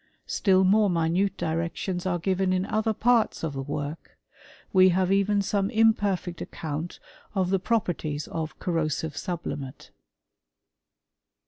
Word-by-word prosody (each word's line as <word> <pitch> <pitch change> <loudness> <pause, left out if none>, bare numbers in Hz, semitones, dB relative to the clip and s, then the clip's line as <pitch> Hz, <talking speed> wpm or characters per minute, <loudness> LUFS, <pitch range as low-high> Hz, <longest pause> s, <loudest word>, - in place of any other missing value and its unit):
* - - -45
Still 190 -2 +3
more 205 +2 +4
min 170 +3 +2
directions 170 +3 -2
are 175 -1 +1
given 185 +2 0
in 185 0 0
other 220 +2 0
parts 230 -1 +2
of 160 -3 -2
the 135 - -4
work: 145 +3 -5 0.6
have 185 0 +4
even 200 +1 +2
some 200 0 0
imperfect 205 -6 +1
account 160 +2 -5 0.4
of 185 -2 +1
the 195 - +2
properties 175 -8 -1 0.3
corrosive 160 -3 -2
sublimate. 155 -7 -5
185 Hz, 120 wpm, -26 LUFS, 165-200 Hz, 0.6 s, more